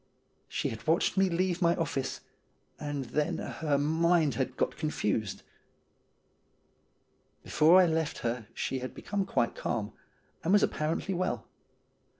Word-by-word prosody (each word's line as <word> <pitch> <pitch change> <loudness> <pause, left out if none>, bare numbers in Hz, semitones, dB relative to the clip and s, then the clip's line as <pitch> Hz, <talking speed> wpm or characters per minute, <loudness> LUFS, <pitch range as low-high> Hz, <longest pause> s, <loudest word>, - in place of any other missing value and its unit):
She - - -2
had 110 +5 -8
watched 165 +2 +2
me 190 -1 +3
leave 180 +1 0
my 170 0 +4
office, 135 -5 -2 0.6
and 145 -2 -3
then 150 +6 -1
her 150 -3 -1
mind 160 +1 +3
had 130 - -2
got - - 0
confused. 110 - -2 2.0
Before 165 +4 +5
I 185 - +7
left 160 -2 0
her 115 -2 -2
she 130 - -2
had 130 0 -6
become 200 -1 -2
quite 115 - +1
calm, 105 -3 -3 0.5
and 175 - +2
was 205 - +6
ap - - +2
parently 160 +5 -1
well. 185 +1 -1
155 Hz, 140 wpm, -30 LUFS, 135-175 Hz, 2.0 s, I